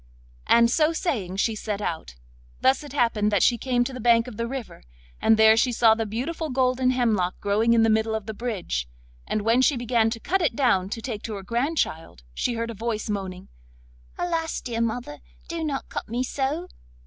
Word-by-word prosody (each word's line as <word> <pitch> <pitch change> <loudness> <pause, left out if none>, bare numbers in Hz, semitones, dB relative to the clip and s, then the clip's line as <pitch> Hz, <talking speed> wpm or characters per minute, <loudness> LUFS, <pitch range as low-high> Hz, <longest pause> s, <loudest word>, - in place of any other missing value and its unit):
And 235 0 +5
so 310 +4 +3
saying 220 - -2
she 220 +3 +1
set 210 -1 -4
out. 160 - -4 0.4
Thus 265 +2 +3
it 290 - -10
happened 230 -6 +1
that 205 -3 +3
she 240 -2 +3
came 245 0 +1
to 260 - -5
the 255 - -6
bank 235 0 +4
of 245 - -8
the 230 +2 -3
river, 260 - -7 0.4
and 220 - +4
there 220 0 +7
she 245 +2 +2
saw 225 -1 +5
the 225 0 -2
beautiful 290 +9 -3
golden 255 -1 +1
hemlock 220 -8 +1
growing 215 +3 +2
in 225 - +4
the 225 - +4
middle 220 0 +1
of 220 -2 -4
the 220 - -5
bridge, 195 - -3 0.4
and 215 - -1
when 230 +3 +3
she 265 0 +3
began 235 -2 +2
to 230 0 -4
cut 380 +10 0
it 330 - +1
down 210 -9 +2
to 225 +1 -5
take 220 -5 -4
to 220 - -5
her 195 - -7
grandchild, 235 - -2
she 240 - -1
heard 230 0 -3
a - - -6
voice 220 0 -3
moaning: 190 -2 -5 0.7
'Alas! 330 -2 -1
dear 230 -2 -3
mother, 225 -10 -3 0.3
do 335 -1 -4
not 285 -3 -3
cut - - -6
me 240 +3 -1
so! 285 +7 -2
230 Hz, 205 wpm, -25 LUFS, 215-255 Hz, 0.7 s, there